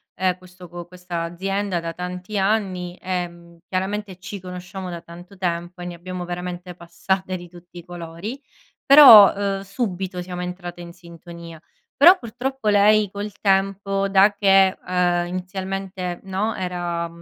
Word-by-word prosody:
ehm, 185 -1 0
questo 180 0 -14
co 175 0 -9
questa 180 -1 -6
azienda 190 +2 -2
da 165 0 -5
tanti 180 +3 -6
anni. 190 -3 -1
Ehm, 175 -2 -5
chiaramente 195 +1 -3
ci 195 +2 -8
conosciamo 180 +1 -8
da 170 -1 -6
tanto 175 +4 -13
tempo 175 0 -3
e - - -6
ne 175 - -5
abbiamo 180 +1 -7
veramente 180 0 -6
passate 185 +2 -3
di 175 0 -11
tutti 175 0 -16
i 170 - -10
colori, 175 +8 -7 0.4
però, 270 -8 +10
ehm, 195 -1 -2
subito 190 -3 -4
siamo 180 0 -6
entrate 180 -1 -6
in 170 0 -10
sintonia. 170 -1 -12 0.3
Però 350 +7 +8
purtroppo 245 +1 -3
lei 210 0 +4
col 205 +1 -5
tempo 195 0 +1
da 195 +1 +5
che, 195 -2 +4
ehm, 175 -1 +1
inizialmente 185 0 -5
no, 195 +3 -2
era 175 -2 -3
185 Hz, 145 wpm, -22 LUFS, 175-195 Hz, 0.4 s, però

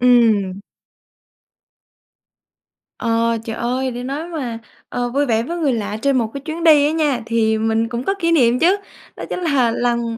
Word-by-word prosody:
Ừm. 220 -6 +3 2.4
Ờ, 230 0 +1
trời 225 0 -4
ơi! 255 +3 -1
Để 245 0 -6
nói 285 +6 -4
mà, 255 -9 -4 0.3
ờ, 245 0 -2
vui 280 +4 +1
vẻ 225 -3 +1
với 340 +8 -4
người 295 -6 +1
lạ 210 -2 -3
trên 275 0 +2
một 235 -3 +1
cái 280 - -6
chuyến 320 +3 -5
đi 305 -3 +6
á 295 - +2
nha, 295 -6 0
thì 225 -1 +1
mình 225 +1 0
cũng 240 0 -3
có 390 - 0
kỷ 335 -2 +1
niệm 250 -6 +3
chứ. 365 +5 +4 0.4
Đó - - -8
chính - - -3
là 280 -9 +2
lần, 235 -1 -1
245 Hz, 185 wpm, -19 LUFS, 230-290 Hz, 2.4 s, đi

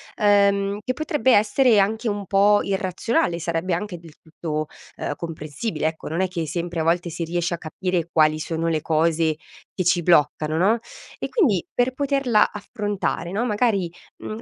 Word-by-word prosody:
ehm, 200 -1 +3
che 255 - -1
potrebbe 290 -2 +1
essere 220 +3 +4
anche 220 +4 +1
un 205 -1 -3
po' 205 +2 +4
irrazionale, 190 - 0
sarebbe 170 +2 -2
anche 180 0 -5
del 165 -2 -14
tutto, 155 -1 -4 0.3
ehm, - - -3
comprensibile 155 +2 -4
ecco. 160 0 -5
Non 165 +4 -1
è 190 - +2
che 180 -1 -6
hai 160 - -2
sempre 170 +1 -3
a - - +1
volte 170 +2 +1
si 170 - -4
riesce 175 +1 -1
a - - -2
capire 170 +1 -2
quali 155 -1 +3
sono 165 +1 -2
le 160 -2 0
cose 160 0 +1 0.4
che 185 - -2
ci 175 0 +2
bloccano, 155 -2 +2
no, 205 +7 +3 0.4
e - - -3
quindi 255 - +2
per 245 +1 +1
poterla 275 -5 +2
affrontare, 205 -4 -3
no, 215 +5 -1
magari, 210 -6 +1 0.3
mhmm, 215 +1 -7
185 Hz, 175 wpm, -23 LUFS, 165-210 Hz, 0.4 s, essere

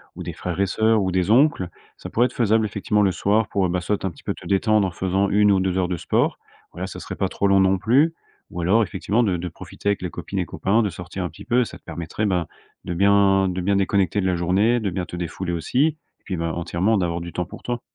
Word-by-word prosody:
ou - - -7
des - - -5
frères 90 0 -5
et 100 - +3
sœurs 110 +3 +2
ou 95 - 0
des 90 +1 0
oncles. 125 - +3 0.3
Ça - - -8
pourrait 120 - +3
être - - -12
faisable 110 -1 +2
effectivement, 105 0 0
le 95 - +3
soir 100 +5 +1
pour, 95 -2 +1
ben, 90 +1 0
soit 105 +3 -2
un - - +1
petit 80 - -17
peu - - -2
te - - -14
détendre 105 +1 +2
en - - -5
faisant 95 +3 0
1 105 0 +4
ou 95 - +3
2 95 0 0
heures 90 -1 +1
de 90 -1 -2
sport. - - 0 0.3
Voilà, - - -5
ça - - -8
serait - - -7
pas 95 - 0
trop 100 - 0
long 100 0 +4
non 95 0 +3
plus. 135 - +3 0.4
Ou 90 - -4
alors, 95 +7 +3
effectivement, 105 +4 0
de 95 -5 +1
de 90 +1 -4
profiter 100 - -5
avec 100 - 0
les 90 - -3
copines - - -5
et - - 0
copains, 110 +4 +1
de 105 - 0
sortir 90 +2 -6
un 90 - -2
petit - - -13
peu, 125 0 +3
ça - - -9
te - - -31
permettrait, 85 +6 -4
ben, 90 -5 0 0.4
de 90 - -3
bien 100 +1 +4
de 90 0 -3
bien 100 +3 +1
déconnecter 100 0 +1
de - - -2
la 90 -1 +1
journée, 95 +8 +2
de 105 -3 -1
bien 90 0 -3
te - - -8
défouler 85 +1 -4
aussi 85 - -2
et 155 -1 -9
puis, 95 - -4
ben, 85 0 -2
entièrement 85 +6 0
d'avoir 85 -2 -1
du 85 0 -7
temps 90 - -2
pour - - -11
toi. 120 -1 -3
95 Hz, 270 wpm, -23 LUFS, 90-105 Hz, 0.4 s, 1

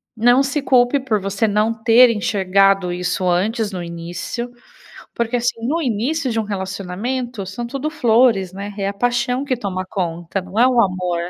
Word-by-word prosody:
Não 245 +3 +4
se 275 +2 -1
culpe 250 +1 +3
por 230 -6 -1
você 195 +3 0
não 210 +2 +1
ter 230 +2 +5
enxergado 195 -3 +2
isso 180 +1 -2
antes 210 +5 0
no 180 -2 -5
início, 170 +8 -6 0.6
porque, 235 +1 -1
assim, 235 -1 -2
no 330 +5 0
início 260 +4 -1
de 225 - -1
um - - 0
relacionamento, 200 +4 -4
são 195 +6 -5
tudo 275 +5 -3
flores, 230 - +2
né. 200 +2 -6
É 195 -1 -1
a - - -5
paixão 245 +4 0
que 275 -2 -1
toma 185 -4 -4
conta, 175 0 -3
não 185 +4 -4
é 245 - +6
o 250 -2 +2
amor. 180 -3 -1
215 Hz, 175 wpm, -19 LUFS, 190-245 Hz, 0.6 s, é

